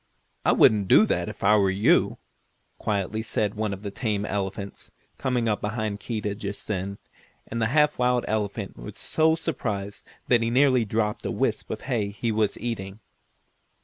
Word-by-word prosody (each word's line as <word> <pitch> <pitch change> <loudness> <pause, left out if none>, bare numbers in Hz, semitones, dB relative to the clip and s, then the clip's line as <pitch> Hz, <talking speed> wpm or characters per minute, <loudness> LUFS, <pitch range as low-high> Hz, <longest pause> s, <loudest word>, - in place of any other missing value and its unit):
I - - +4
wouldn't 105 -3 +5
do - - +7
that - - -1
if - - -9
I 105 +2 +6
were 100 -2 +3
you," 95 +3 +3 0.6
quietly 105 +1 -1
said 105 -2 -1
one 110 -1 -2
of 100 +1 -6
the 100 - -4
tame 105 -1 -1
elephants, 100 0 -4 0.3
coming 125 -3 0
up 105 -2 0
behind 105 -1 -2
Keedah 105 -2 -3
just 100 -1 -5
then, 100 -1 -3 0.5
and 115 +1 -4
the 115 - +3
half 150 +3 +3
wild 125 0 +2
elephant 105 -1 -2
was - - -9
so 160 0 +2
surprised 105 -11 -3 0.2
that 120 -2 +4
he 115 - +1
nearly 130 -1 +4
dropped 105 0 -1
a - - -2
wisp - - -1
of - - -4
hay 115 -7 -1
he 110 +3 -2
was 105 -1 +1
eating. 105 -4 -5
105 Hz, 175 wpm, -26 LUFS, 100-115 Hz, 0.6 s, do